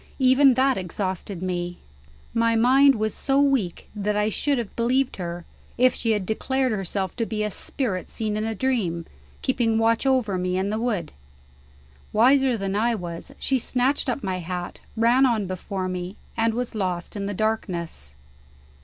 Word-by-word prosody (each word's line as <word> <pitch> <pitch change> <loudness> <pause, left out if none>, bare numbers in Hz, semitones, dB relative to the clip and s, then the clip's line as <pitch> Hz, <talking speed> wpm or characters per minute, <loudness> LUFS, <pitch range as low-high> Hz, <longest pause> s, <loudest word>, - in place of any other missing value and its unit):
Even 260 0 +5
that 265 +1 +3
exhausted 185 0 -4
me. 175 -1 -2 0.6
My 230 0 +2
mind 265 +4 +6
was 215 -1 -1
so 275 0 +1
weak 270 -11 +1
that 210 0 -1
I 210 +1 +2
should 280 +6 +1
have 235 -4 -4
believed 255 +3 +1
her, 175 -1 -5 0.3
if 255 +1 +5
she 225 -1 0
had 205 -3 -1
declared 260 +5 0
herself 195 -2 -2
to 230 - 0
be 215 -1 -2
a 210 - -1
spirit 195 -5 -3
seen 215 -2 -3
in 215 - -1
a 225 0 -2
dream, 190 -10 0 0.4
keeping 235 -4 +1
watch 225 +3 +2
over 235 -8 +2
me 180 0 -1
in 195 +2 0
the 215 - -1
wood. 210 -9 -1 1.0
Wiser 255 +2 +4
than 195 -1 -2
I 230 +3 +2
was, 175 +4 -7
she 265 -1 0
snatched 260 +4 0
up 250 +2 -2
my 185 -1 -2
hat, 180 +1 -5 0.2
ran 240 +4 +5
on 225 -5 +1
before 185 +1 -4
me, 180 +1 -4 0.2
and 225 -1 +1
was 245 0 -2
lost 185 -4 -3
in 200 -1 -3
the 205 - -3
darkness. 175 - -2
220 Hz, 170 wpm, -24 LUFS, 185-250 Hz, 1.0 s, mind